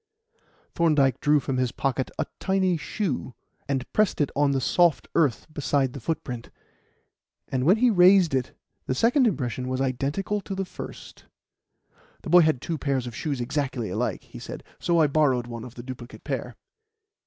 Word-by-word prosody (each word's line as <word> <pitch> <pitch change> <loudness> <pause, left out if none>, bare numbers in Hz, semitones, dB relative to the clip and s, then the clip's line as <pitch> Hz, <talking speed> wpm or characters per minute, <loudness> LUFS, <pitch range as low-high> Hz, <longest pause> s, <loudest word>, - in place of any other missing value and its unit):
Thorndyke 145 -6 +3
drew 150 0 +4
from 135 -1 -3
his 125 -2 +1
pocket 135 -1 -1
a - - 0
tiny 190 -2 +1
shoe, 155 - -3 0.3
and 135 -2 -1
pressed 215 -2 +2
it 145 - +1
on 145 0 +3
the 135 -1 +1
soft 170 +4 +2
earth 145 -8 +2
beside 140 -3 0
the 140 - -6
footprint; 125 -4 -4 1.0
and 130 -1 -1
when 185 +7 +5
he 245 +1 +4
raised 180 -3 +6
it 130 -1 -2 0.3
the 130 - 0
second 245 - +4
impression 125 - -2
was 130 0 -2
identical 135 +10 -1
with 195 - -3
the 195 - -1
first. - - -10 1.0
"The 165 - -5
boy 180 0 +8
had 155 -5 +2
two 165 -3 -3
pairs 135 -3 -1
of 120 -2 -7
shoes 145 -2 -3
exactly 125 -4 -2
alike," - - -2
he - - -11
said, - - -8 0.2
"so 170 -1 +2
I 160 - +6
borrowed 140 -4 +2
one 120 -1 -7
of 125 0 -10
the 120 - -8
duplicate 125 -1 -9
pair." - - -4
140 Hz, 175 wpm, -25 LUFS, 130-170 Hz, 1.0 s, boy